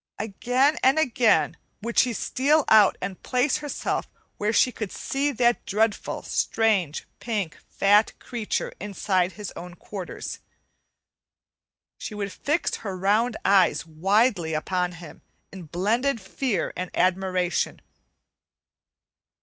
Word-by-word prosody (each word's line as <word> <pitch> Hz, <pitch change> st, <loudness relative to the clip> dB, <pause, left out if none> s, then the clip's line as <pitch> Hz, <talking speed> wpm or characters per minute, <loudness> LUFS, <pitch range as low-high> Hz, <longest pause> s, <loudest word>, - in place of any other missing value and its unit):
Again 245 Hz, +8 st, +1 dB
and 265 Hz, +3 st, +4 dB
again 250 Hz, -6 st, +3 dB, 0.3 s
would 235 Hz, +1 st, +1 dB
she 250 Hz, -, +4 dB
steal 280 Hz, +6 st, +1 dB
out 215 Hz, -3 st, +6 dB
and 190 Hz, 0 st, -5 dB
place 255 Hz, +4 st, +1 dB
herself 295 Hz, -1 st, -3 dB, 0.3 s
where 210 Hz, +1 st, 0 dB
she 250 Hz, +3 st, +4 dB
could 215 Hz, -5 st, -5 dB
see 280 Hz, +2 st, -1 dB
that 240 Hz, -2 st, +2 dB
dreadful, 215 Hz, +1 st, 0 dB
strange, 200 Hz, -9 st, 0 dB
pink, 205 Hz, -7 st, -3 dB
fat 205 Hz, +2 st, +3 dB
creature 235 Hz, -4 st, -3 dB
inside 190 Hz, -2 st, 0 dB
his 210 Hz, -3 st, -7 dB
own 175 Hz, 0 st, -8 dB
quarters. 185 Hz, 0 st, -7 dB, 1.6 s
She 215 Hz, -, -6 dB
would 200 Hz, -2 st, -4 dB
fix 300 Hz, +4 st, -1 dB
her 195 Hz, -4 st, -5 dB
round 215 Hz, +5 st, +1 dB
eyes 185 Hz, -6 st, +4 dB
widely 180 Hz, +1 st, +1 dB
upon 180 Hz, +3 st, -1 dB
him 170 Hz, -3 st, -12 dB, 0.3 s
in 180 Hz, -4 st, -10 dB
blended 230 Hz, -, 0 dB
fear 200 Hz, +1 st, -2 dB
and 185 Hz, 0 st, -4 dB
admiration. 185 Hz, -1 st, 0 dB
210 Hz, 115 wpm, -25 LUFS, 185-240 Hz, 1.6 s, out